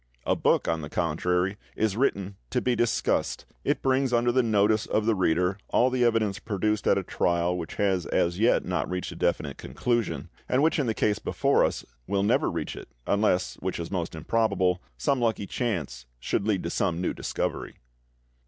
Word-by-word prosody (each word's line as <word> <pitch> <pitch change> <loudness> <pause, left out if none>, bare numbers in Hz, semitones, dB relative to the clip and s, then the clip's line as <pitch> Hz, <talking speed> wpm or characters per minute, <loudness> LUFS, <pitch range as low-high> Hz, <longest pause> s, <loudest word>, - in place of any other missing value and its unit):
A - - +2
book, - - +2
on 80 -1 0
the 75 - -6
contrary, 90 +4 0 0.2
is 110 -2 0
written 100 -6 0
to - - +1
be 125 -1 +1
discussed; 120 -1 0 0.2
it - - 0
brings 135 -1 +2
under 120 0 +3
the 130 +1 +3
notice 110 -1 +2
of 110 - 0
the 115 - +3
reader 90 0 +1
all 125 +1 +3
the 125 -1 +1
evidence 110 -4 +2
produced 105 0 -1
at - - +4
a 100 - -1
trial 85 0 0
which 85 -3 -5
has 95 -4 +1
as 85 +2 +1
yet 115 +3 +3
not 90 -1 -1
reached 90 0 -3
a - - -8
definite - - -1
conclusion, 90 - -2 0.2
and 130 +3 +3
which 160 0 +3
in 140 - +1
the 110 - 0
case 105 -2 +1
before - - +2
us - - -1 0.2
will 100 -1 +1
never 100 - +2
reach - - -4
it, - - -10 0.2
unless, 100 -3 +1
which 95 -1 -3
is 85 - -5
most 85 -4 -3
improbable, 90 0 +1 0.2
some 140 -3 +1
lucky 115 -4 0
chance 80 - -3
should 100 - -1
lead 100 -4 +1
to 85 - -3
some 85 -4 0
new 90 - -1
discovery. - - -3
100 Hz, 190 wpm, -27 LUFS, 90-115 Hz, 0.2 s, at